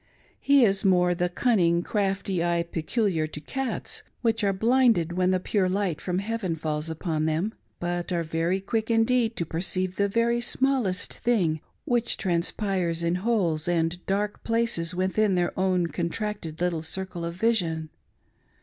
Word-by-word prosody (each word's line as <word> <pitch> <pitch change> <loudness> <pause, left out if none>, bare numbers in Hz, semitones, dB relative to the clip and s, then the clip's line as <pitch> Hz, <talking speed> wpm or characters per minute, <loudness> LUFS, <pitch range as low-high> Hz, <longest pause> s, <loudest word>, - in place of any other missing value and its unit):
His 250 -9 +4
is - - -1
more 180 -2 +4
the 175 0 0
cunning, 175 -4 +2
crafty 195 -4 -1
eye 170 -1 +1
peculiar 170 0 -1
to 150 - -7
cats, 265 - -3 0.2
which 225 -2 +1
axe 195 -1 +1
blinded 230 -6 +3
when 185 +1 +2
the 185 0 +2
pure 185 0 0
light 185 -4 -1
from 180 -1 -2
heaven 200 -3 -2
falls 155 0 -2
upon 160 -1 -2
them, 165 +8 0 0.3
but 175 +1 -3
are 170 -1 0
very 165 +3 0
quick 220 +3 -2
indeed 230 0 +2
to 170 - -2
perceive 185 +3 -2
the 200 - +2
very 235 +3 +1
smallest 245 -6 0
thing 175 -10 +1 0.2
which 240 -5 +1
transpires 175 -1 -1
in 170 +1 +1
holes 185 -7 0
and 175 0 0
dark 205 +1 -1
places 225 -7 +1
within 190 +2 +1
their 175 -1 0
own 185 -2 +1
contracted 170 0 -3
little 175 -3 0
circle 175 +1 -5
of 170 0 -4
vision. 175 -7 0
185 Hz, 155 wpm, -26 LUFS, 170-220 Hz, 0.3 s, His